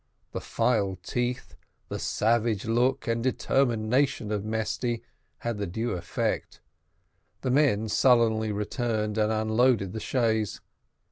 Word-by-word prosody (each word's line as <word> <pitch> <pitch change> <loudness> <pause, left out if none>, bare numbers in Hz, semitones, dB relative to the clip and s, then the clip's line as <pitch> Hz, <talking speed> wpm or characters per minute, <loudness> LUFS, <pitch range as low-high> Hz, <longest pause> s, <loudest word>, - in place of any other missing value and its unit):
The - - -4
filed 100 -7 0
teeth, 125 +7 -2 0.4
the - - -4
savage 115 -2 +1
look, 125 +4 +1
and 115 0 0
determination 125 -1 +1
of 105 -2 -1
Mesty, 110 +2 -2 0.3
had 115 -3 -3
the 100 - -2
due 115 +7 -2
effect. 85 -1 -2 0.8
The 130 - 0
men 125 -6 +3
sullenly 110 -2 +3
returned 105 +1 -1
and 105 0 +2
unloaded 110 -2 +2
the 110 - -3
chaise. 110 -3 0
110 Hz, 120 wpm, -27 LUFS, 105-120 Hz, 0.8 s, men